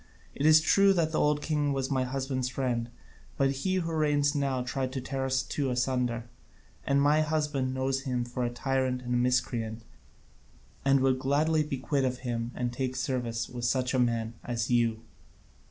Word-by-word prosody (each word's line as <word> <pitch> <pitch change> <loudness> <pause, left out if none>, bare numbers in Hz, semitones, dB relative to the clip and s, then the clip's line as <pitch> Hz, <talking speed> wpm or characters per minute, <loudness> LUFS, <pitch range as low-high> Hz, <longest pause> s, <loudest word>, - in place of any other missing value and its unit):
It 145 - +1
is 155 0 +7
true 195 +4 +5
that 165 -4 +1
the 155 - 0
old 150 0 +2
king 150 -2 0
was 135 0 -2
my 130 -1 +1
husband's 130 0 -2
friend, 125 -3 -2 0.5
but 135 0 +3
he 140 +8 -1
who 170 -3 -1
reigns 145 -2 +2
now 135 -3 0
tried 130 +1 -2
to 135 - -2
tear 135 +1 -3
us 130 0 +1
two 140 -3 -2
asunder, 125 -2 0 0.6
and 140 +1 +3
my 145 +2 +4
husband 150 -4 -1
knows 135 0 0
him 125 -3 -2
for 125 +1 -3
a 120 - 0
tyrant 130 0 -1
and 125 0 -2
a - - +2
miscreant, 120 -2 0 1.0
and 135 -1 +4
would 130 -1 +2
gladly 150 +4 +2
be 150 -2 -2
quit 135 +1 0
of 130 -1 0
him 115 -1 -2
and 120 -1 -2
take 130 0 -2
service 120 -3 -2
with 120 -1 -5
such 130 +1 +1
a 130 - +2
man 115 -2 0
as 120 0 -2
you." 115 -2 +2
130 Hz, 185 wpm, -29 LUFS, 125-140 Hz, 1.0 s, is